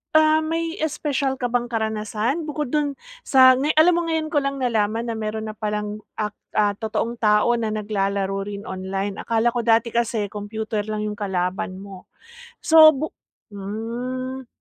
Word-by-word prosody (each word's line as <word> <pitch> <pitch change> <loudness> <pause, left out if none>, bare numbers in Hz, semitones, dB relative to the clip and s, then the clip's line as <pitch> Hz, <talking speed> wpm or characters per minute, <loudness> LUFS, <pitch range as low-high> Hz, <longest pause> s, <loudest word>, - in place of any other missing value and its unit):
ah, 310 0 +6
may 330 +3 -2
espesyal 285 -3 -1
ka 245 -2 -3
bang 240 0 0
karanasan, 220 +6 -2
bukod 300 -3 -3
dun 290 -2 0 0.3
sa 260 -1 +7
ngay 295 +3 +1
alam 320 +3 +6
mo - - 0
ngayon 320 -1 -1
ko 295 - +3
lang 275 0 -2
nalaman 225 -2 0
na - - -1
meron 220 0 -3
na 215 - -17
pa 215 - -3
lang 210 0 -3 0.2
ak 210 -1 -2 0.2
ah, 210 -1 +3
totoong 230 +1 -3
tao 210 +1 +4
na 225 - -1
naglalaro 195 -2 -1
rin 205 0 -6
online. 195 +1 -4
Akala 230 +1 +1
ko 240 - -2
dati 230 0 +3
kasi 225 -3 0
kompyuter 210 0 -4
lang 215 0 -2
'yung 210 -1 -4
kalaban 185 -1 -2
mo. 195 -2 -11 0.6
So, 315 -1 +8
bu 305 +4 -3 0.4
hmm. 240 +6 -5
225 Hz, 170 wpm, -23 LUFS, 210-270 Hz, 0.6 s, So